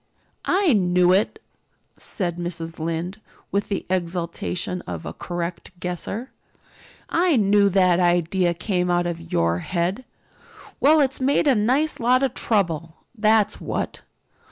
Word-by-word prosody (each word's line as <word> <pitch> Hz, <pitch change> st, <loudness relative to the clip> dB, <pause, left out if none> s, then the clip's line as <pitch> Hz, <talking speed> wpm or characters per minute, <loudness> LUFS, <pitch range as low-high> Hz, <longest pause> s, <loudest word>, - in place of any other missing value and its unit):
"I 375 Hz, -6 st, +4 dB
knew 180 Hz, -3 st, +3 dB
it!" 195 Hz, +3 st, +1 dB, 0.6 s
said 175 Hz, -4 st, -3 dB
Mrs. 170 Hz, -2 st, -5 dB
Lynde, 165 Hz, +5 st, -3 dB, 0.3 s
with 200 Hz, 0 st, -1 dB
the 195 Hz, -, -2 dB
exultation 180 Hz, 0 st, -2 dB
of 85 Hz, -2 st, -5 dB
a -, -, -5 dB
correct 175 Hz, +1 st, -5 dB
guesser. 185 Hz, +8 st, -4 dB, 0.8 s
"I 340 Hz, -1 st, +2 dB
knew 205 Hz, -2 st, +4 dB
that 185 Hz, -2 st, +3 dB
idea 175 Hz, 0 st, +2 dB
came 180 Hz, -1 st, -1 dB
out 175 Hz, 0 st, +2 dB
of 170 Hz, -1 st, -5 dB
your 85 Hz, +1 st, +1 dB
head. 185 Hz, -, -2 dB, 0.8 s
Well, 305 Hz, +2 st, +5 dB
it's 270 Hz, -1 st, 0 dB
made 275 Hz, +4 st, +2 dB
a 280 Hz, -, +5 dB
nice 255 Hz, +8 st, +1 dB
lot 250 Hz, +2 st, +3 dB
of 270 Hz, -, +1 dB
trouble, 170 Hz, -7 st, 0 dB, 0.2 s
that's 215 Hz, -1 st, +2 dB
what. -, -, -3 dB
180 Hz, 130 wpm, -23 LUFS, 175-220 Hz, 0.8 s, Well